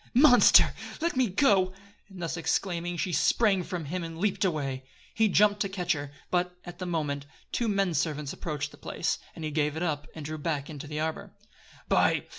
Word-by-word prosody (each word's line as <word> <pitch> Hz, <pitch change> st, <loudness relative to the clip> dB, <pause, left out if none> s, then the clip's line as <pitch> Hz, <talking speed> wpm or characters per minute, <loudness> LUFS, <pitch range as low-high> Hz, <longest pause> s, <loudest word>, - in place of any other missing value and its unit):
"Monster! 250 Hz, -2 st, +7 dB, 0.3 s
let 335 Hz, -1 st, 0 dB
me 255 Hz, -1 st, +3 dB
go!" 190 Hz, -3 st, +3 dB, 0.4 s
And 185 Hz, -3 st, -8 dB
thus 165 Hz, -, -2 dB
exclaiming 175 Hz, 0 st, -1 dB
she 175 Hz, +3 st, -1 dB
sprang 205 Hz, -2 st, +3 dB
from 175 Hz, -2 st, -5 dB
him, 175 Hz, +4 st, -3 dB
and 165 Hz, -1 st, -7 dB
leaped 200 Hz, +3 st, 0 dB
away. 140 Hz, -7 st, -1 dB, 0.3 s
He 220 Hz, 0 st, +3 dB
jumped 205 Hz, +1 st, +4 dB
to 200 Hz, -, 0 dB
catch 180 Hz, -2 st, -2 dB
her; 145 Hz, -2 st, -6 dB, 0.2 s
but, 180 Hz, 0 st, 0 dB
at 175 Hz, -, -9 dB
that 185 Hz, -, -3 dB
moment, 145 Hz, -4 st, -2 dB, 0.2 s
two 235 Hz, -, 0 dB
men 195 Hz, -4 st, +1 dB
servants 150 Hz, -1 st, -1 dB
approached 150 Hz, -2 st, -4 dB
the -, -, -15 dB
place, -, -, -2 dB, 0.2 s
and 160 Hz, -, -6 dB
he 155 Hz, -, -3 dB
gave 150 Hz, 0 st, 0 dB
it 165 Hz, -, -2 dB
up, 150 Hz, -3 st, -2 dB
and 155 Hz, -2 st, -7 dB
drew 155 Hz, +1 st, -5 dB
back 145 Hz, -2 st, -2 dB
into 145 Hz, 0 st, -8 dB
the 150 Hz, +1 st, -4 dB
arbor. 160 Hz, 0 st, -4 dB, 0.5 s
"By -, -, +3 dB
170 Hz, 200 wpm, -28 LUFS, 150-190 Hz, 0.5 s, Monster